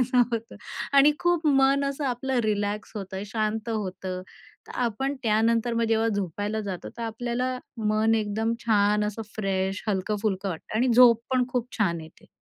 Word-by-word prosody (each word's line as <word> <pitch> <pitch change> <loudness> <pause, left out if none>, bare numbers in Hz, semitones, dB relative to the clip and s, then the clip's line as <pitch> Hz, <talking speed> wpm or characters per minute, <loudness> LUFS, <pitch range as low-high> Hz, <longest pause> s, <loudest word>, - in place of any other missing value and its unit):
असं 250 0 +3
होतं. 230 +1 -4 0.4
आणि 280 +2 +7
खूप 350 -2 +1
मन 275 -1 +4
असं 275 +1 -2
आपलं 260 +1 -1
रिलॅक्स 205 0 -1
होतं, 195 -1 -5
शांत 215 +1 -2
होतं. 185 -3 -4 0.5
तर - - -8
आपण 270 +6 -2
त्यानंतर 230 +2 +2
मग 230 - +1
जेव्हा 225 0 +2
झोपायला 205 +1 -2
जातो, 195 -4 -5
तर - - -4
आपल्याला 240 +3 -2 0.3
मन 220 +1 +3
एकदम 220 +1 -1
छान 210 -1 +3
असं 210 +2 -3
फ्रेश, 195 -1 -1
हलकं-फुलकं 200 0 -1
वाटतं 175 +5 -6
आणि 250 +3 +2
झोप 235 -2 +7
पण 255 -1 +2
खूप 250 -1 -1
छान 170 -6 +1
येते. 160 +1 -16
220 Hz, 160 wpm, -26 LUFS, 205-245 Hz, 0.5 s, आणि